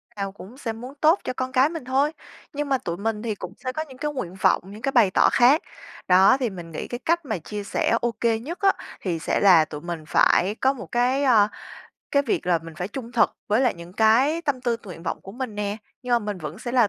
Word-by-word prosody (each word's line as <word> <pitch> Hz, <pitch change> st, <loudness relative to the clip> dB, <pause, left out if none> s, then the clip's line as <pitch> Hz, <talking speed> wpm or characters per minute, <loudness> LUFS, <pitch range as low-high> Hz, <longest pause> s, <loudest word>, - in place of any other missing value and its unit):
nào 195 Hz, -1 st, -3 dB
cũng 205 Hz, +5 st, -13 dB
sẽ 230 Hz, -5 st, -4 dB
muốn 250 Hz, +4 st, -9 dB
tốt 320 Hz, +5 st, +5 dB
cho 255 Hz, -, -3 dB
con 255 Hz, 0 st, -3 dB
cái 265 Hz, +3 st, +4 dB
mình 325 Hz, -6 st, -7 dB
thôi, 275 Hz, +4 st, +2 dB, 0.4 s
nhưng 290 Hz, 0 st, -3 dB
mà 270 Hz, -, +3 dB
tụi 170 Hz, -6 st, -5 dB
mình 215 Hz, +1 st, -2 dB
thì 220 Hz, -3 st, -2 dB
cũng 180 Hz, 0 st, -8 dB
sẽ 255 Hz, -, -4 dB
có 310 Hz, +4 st, -3 dB
những 260 Hz, -1 st, -13 dB
cái 295 Hz, +1 st, -2 dB
nguyện 180 Hz, -10 st, -5 dB
vọng, 190 Hz, -, +3 dB
những 215 Hz, +2 st, -10 dB
cái 275 Hz, -, 0 dB
bày 225 Hz, -8 st, +4 dB
tỏ -, -, +4 dB
khác. 260 Hz, +6 st, +5 dB, 0.5 s
Đó, 190 Hz, +8 st, +6 dB
thì 245 Hz, -4 st, 0 dB
mình 175 Hz, -3 st, -9 dB
nghĩ -, -, -5 dB
cái 240 Hz, -, -5 dB
cách 335 Hz, -1 st, +1 dB
mà 220 Hz, -6 st, -2 dB
chia 205 Hz, +5 st, -6 dB
sẻ 230 Hz, +3 st, +1 dB
OK 235 Hz, -1 st, -2 dB, 0.2 s
nhất 335 Hz, +8 st, -6 dB
á, 390 Hz, -1 st, +5 dB, 0.3 s
thì 170 Hz, -4 st, -2 dB
sẽ -, -, 0 dB
là 175 Hz, -6 st, +6 dB
tụi 150 Hz, -1 st, -8 dB
mình 170 Hz, -2 st, -5 dB
phải 195 Hz, +4 st, +3 dB
có 265 Hz, +3 st, +2 dB
một 265 Hz, -, -9 dB
cái, 255 Hz, +4 st, +2 dB
a, 220 Hz, -6 st, +5 dB, 0.6 s
cái 280 Hz, 0 st, +3 dB
việc 235 Hz, -, -1 dB
là 175 Hz, -2 st, +3 dB
mình 165 Hz, -1 st, -10 dB
phải 180 Hz, +3 st, -4 dB
trung 240 Hz, +1 st, -7 dB
thực 235 Hz, -, +3 dB, 0.2 s
với 215 Hz, +4 st, +3 dB
lại 250 Hz, -3 st, +2 dB
những 170 Hz, +1 st, -11 dB
cái 250 Hz, -, +3 dB
tâm 280 Hz, -5 st, -1 dB
tư 240 Hz, -2 st, 0 dB
t 230 Hz, -, -25 dB
nguyện 170 Hz, -2 st, -9 dB
vọng -, -, -3 dB
của 195 Hz, -, -10 dB
mình 250 Hz, -3 st, -5 dB
nè, 205 Hz, 0 st, -2 dB, 0.3 s
nhưng 250 Hz, -, -6 dB
mà 240 Hz, -, +5 dB
mình 205 Hz, -3 st, -5 dB
vẫn 155 Hz, +1 st, -7 dB
sẽ 240 Hz, -, -5 dB
là 240 Hz, -5 st, +4 dB
230 Hz, 265 wpm, -24 LUFS, 195-260 Hz, 0.6 s, Đó